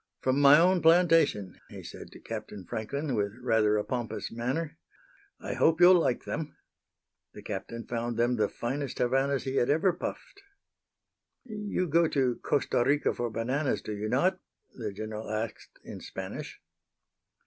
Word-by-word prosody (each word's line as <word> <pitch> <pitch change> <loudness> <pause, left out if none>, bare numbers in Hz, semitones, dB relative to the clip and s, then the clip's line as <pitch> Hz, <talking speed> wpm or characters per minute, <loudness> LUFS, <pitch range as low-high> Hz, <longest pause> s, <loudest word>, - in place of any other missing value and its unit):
"From 130 +1 +1
my 140 +1 +8
own 180 +2 +4
plantation," 165 - +3
he - - -10
said - - -10
to - - -13
Captain 100 -3 -7
Franklin, 140 - -3
with 100 -3 -1
rather 110 -4 +2
a 105 - 0
pompous 110 -4 -4
manner. 130 +7 -3 0.6
"I - - -5
hope 165 +1 +3
you'll 180 +1 +8
like 125 -7 0
them." 155 -1 -5 0.8
The - - -10
Captain 105 +3 -6
found 120 -1 -3
them 120 +1 +2
the 105 -3 +1
finest 135 +2 -4
Havanas 135 +2 +1
he 135 0 -2
had 120 - +2
ever 165 +5 +3
puffed. 405 - -7 1.0
"You 210 -5 -3
go 165 +2 +3
to 130 -5 0
Costa 140 -4 0
Rica 145 +3 +2
for 120 -1 -3
bananas, 125 +6 -1
do - - -5
you 105 +1 -3
not?" 185 +10 +2 0.3
the 110 -4 -5
General 110 +2 -6
asked 110 +1 -5
in - - -8
Spanish. - - -7
130 Hz, 155 wpm, -29 LUFS, 110-155 Hz, 1.0 s, my